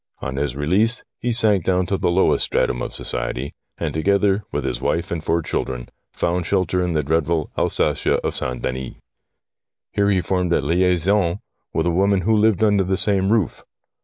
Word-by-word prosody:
On 65 - -5
his 70 -2 -1
release, 95 +11 +1 0.2
he 120 - -1
sank 110 -5 +3
down 90 0 +1
to 95 - -1
the 95 - 0
lowest 90 +2 +3
stratum - - 0
of - - -4
society, 65 +3 -3 0.2
and, - - -3
together 100 +4 +2
with - - -2
his - - -3
wife 85 +2 -1
and 85 -2 -3
four 85 +1 0
children, 60 -4 -3 0.2
found 85 0 -1
shelter 90 -2 +1
in 90 -1 -1
the 75 -1 +1
dreadful 80 +1 0
Alsatia - - +1
of - - -1
St. 65 -1 -3
Denis. 65 0 -4 1.0
Here 100 0 +1
he 95 -2 +3
formed 90 0 0
a - - +3
liaison 90 +3 +2 0.3
with - - 0
a 85 - +2
woman 95 +2 +2
who 110 +5 +2
lived 110 -1 +3
under 105 -2 +3
the 95 +1 -1
same 100 -1 +2
roof. 110 -8 0
90 Hz, 185 wpm, -21 LUFS, 80-100 Hz, 1.0 s, sank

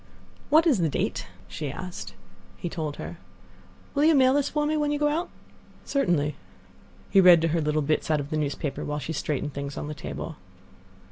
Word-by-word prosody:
"What 315 +3 +6
is 285 - +4
the 165 -2 +2
date?" 115 - -2 0.2
she 145 - -4
asked. 180 +4 -7 0.4
He 175 - -4
told 155 -4 -3
her. 170 - -7 0.7
"Will 285 - +2
you 320 0 +6
mail 260 -1 +5
this 285 -1 +2
for 300 -1 0
me 305 +1 +1
when 295 -1 +1
you 295 - +1
go 295 0 +2
out?" 330 +4 -1 0.6
"Certainly." 170 - +1 0.8
He 195 - +7
read 180 -2 +8
to 165 - +2
her 165 +1 +1
little 150 0 +1
bits 155 +2 0
out 155 -1 +3
of 145 0 -6
the 155 - 0
newspaper, 145 -1 -2
while 150 0 -3
she 155 +2 -4
straightened 150 -1 -2
things 140 0 -5
on - - -4
the 150 - -4
table. 150 +2 -6
165 Hz, 200 wpm, -26 LUFS, -, 0.8 s, read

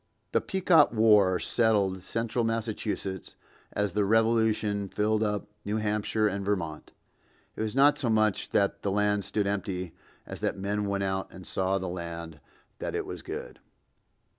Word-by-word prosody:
The - - +2
Pequot 180 -5 +4
war 105 -5 +5
settled 100 -5 +1
central 115 +4 -2
Massachusetts 110 -4 -3 0.4
as 105 -2 -1
the 105 +3 +1
Revolution 110 -2 +2
filled 105 +2 +1
up 105 -2 -1 0.2
New 105 +2 -1
Hampshire 105 0 0
and 100 -1 -2
Vermont. 95 -6 -3 0.6
It - - -5
was 110 +1 -2
not 145 +2 +5
so 130 -5 0
much 110 -2 +2
that 100 0 +1
the 100 - -1
land 105 0 +1
stood 100 +1 0
empty 95 -3 -3 0.3
as - - -8
that - - -1
men 100 +1 -1
went 100 0 -1
out 95 0 -1
and 95 -1 -11
saw 95 +1 0
the 95 -1 -4
land, 85 -3 -6 0.4
that - - -3
it - - -2
was - - -7
good. - - -7
105 Hz, 160 wpm, -28 LUFS, 95-110 Hz, 0.6 s, war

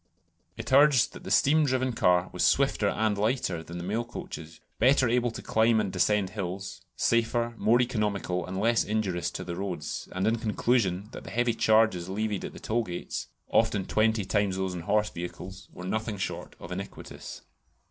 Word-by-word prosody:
It - - -5
urged 140 -3 +5
that - - -11
the - - -5
steam 155 +3 +4
driven 130 -2 0
car 90 -3 +2
was - - -1
swifter - - +3
and 110 -1 +1
lighter 105 -5 0
than 85 +1 -8
the 85 - -5
mail 105 +6 -1
coaches; 80 -8 -8 0.2
better 130 +2 +4
able 120 +1 +2
to 115 - -8
climb 110 0 +3
and 100 -3 -1
descend 95 +1 +2
hills; 95 -2 -5
safer; 115 0 +1
more 115 +3 +3
economical; 105 -7 -1
and 95 +1 -4
less 115 +2 +3
injurious 100 -5 -1
to 95 - -6
the 85 -1 -5
roads; 90 -5 -4
and, 95 +1 -1
in 115 +1 +2
conclusion, 105 -3 0
that - - -9
the - - -9
heavy 120 +3 +1
charges 110 -6 +3
levied 105 0 -2
at - - -7
the - - -10
toll 115 +2 0
gates 90 -4 -5 0.2
(often 100 -3 +2
twenty 110 -1 +1
times 100 -1 0
those 95 -1 -2
on 90 - -5
horse 105 +4 +1
vehicles) 95 +2 -8
were 90 - -9
nothing 110 +2 -2
short 95 - -5
of 85 - -9
iniquitous. 95 +2 -8
105 Hz, 185 wpm, -28 LUFS, 95-115 Hz, 0.2 s, urged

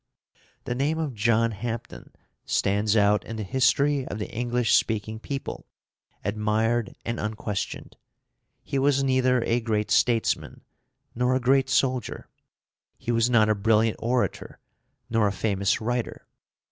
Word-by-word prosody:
The - - -3
name 140 +5 0
of 155 -5 -2
John 115 +1 +2
Hampden 115 +2 -6 0.3
stands 105 +2 +1
out 105 0 +3
in 115 - -7
the 110 - -4
history 135 +5 +2
of - - -5
the 105 - -5
English 120 0 0
speaking 110 0 +1
people, 140 +4 -6 0.6
admired 110 +3 0
and 120 0 -3
unquestioned. 105 -2 -4 0.7
He 140 - -2
was 135 0 +2
neither 130 -2 +2
a 115 +1 +1
great 110 -2 -1
statesman, 115 -3 +1 0.5
nor 125 +1 +1
a - - +2
great 135 +1 +2
soldier; 130 -2 0 0.7
he 120 - -3
was 115 +1 +2
not 115 -3 +4
a 110 - +3
brilliant 110 +1 +2
orator, 120 +1 -2 0.5
nor 115 -2 +2
a - - 0
famous 100 -1 0
writer. 120 +1 -3
115 Hz, 135 wpm, -25 LUFS, 110-125 Hz, 0.7 s, not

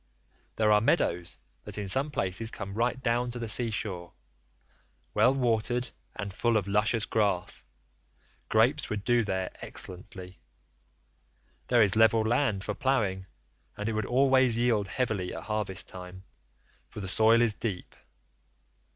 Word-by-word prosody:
There 110 -1 +2
are 105 0 +5
meadows 85 -5 0 0.3
that - - -6
in 105 -1 -3
some 135 +9 +2
places 100 -3 -1
come 100 -3 -6
right 120 +4 0
down 120 +1 +1
to 120 - -6
the 115 -1 -4
sea 115 +2 +3
shore, 90 -5 -4 1.0
well 125 - +4
watered 120 -1 0 0.3
and 100 -1 -5
full 115 +2 +1
of 100 -2 -2
luscious 105 +2 +1
grass; 100 -5 -1 0.9
grapes 125 +7 +2
would 105 -2 -3
do 120 0 +3
there 95 -2 -2
excellently; 90 -1 -5 1.3
there 120 -2 +5
is 100 0 +2
level 110 0 +5
land 115 -4 +1
for 105 - -3
ploughing, 100 -8 0 0.5
and 105 - -3
it 115 - -1
would 110 0 -2
always 130 -2 +4
yield 115 -4 +1
heavily 100 -4 -2
at - - -7
harvest 105 -3 -2
time, 90 0 -10 0.7
for - - -9
the 95 - -5
soil 110 +5 +4
is 120 -3 +3
deep. 100 -5 -5
110 Hz, 145 wpm, -28 LUFS, 100-120 Hz, 1.3 s, are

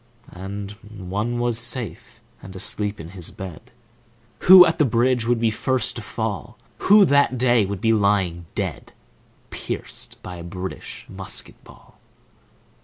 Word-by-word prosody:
And 100 +2 -6
one 105 +3 -4
was 120 -2 +1
safe 120 -3 -2 0.2
and 95 0 -11
asleep 105 +2 -2
in 80 0 -8
his 90 -2 -7
bed 95 +2 -9 0.7
Who 185 0 +10
at 165 +1 0
the - - +6
bridge 125 -1 +2
would 120 -1 +2
be 115 -1 +2
first 130 +1 -1
to - - -5
fall, - - -4 0.2
Who 205 0 +6
that 140 -4 +3
day 120 -4 +3
would 100 0 -5
be 115 0 +3
lying 95 -5 +1
dead, - - -4 0.6
Pierced - - -6
by 90 -1 -7
a 85 - -8
British 90 +2 -7
musket - - -7
ball. - - -18
105 Hz, 145 wpm, -22 LUFS, 95-120 Hz, 0.7 s, Who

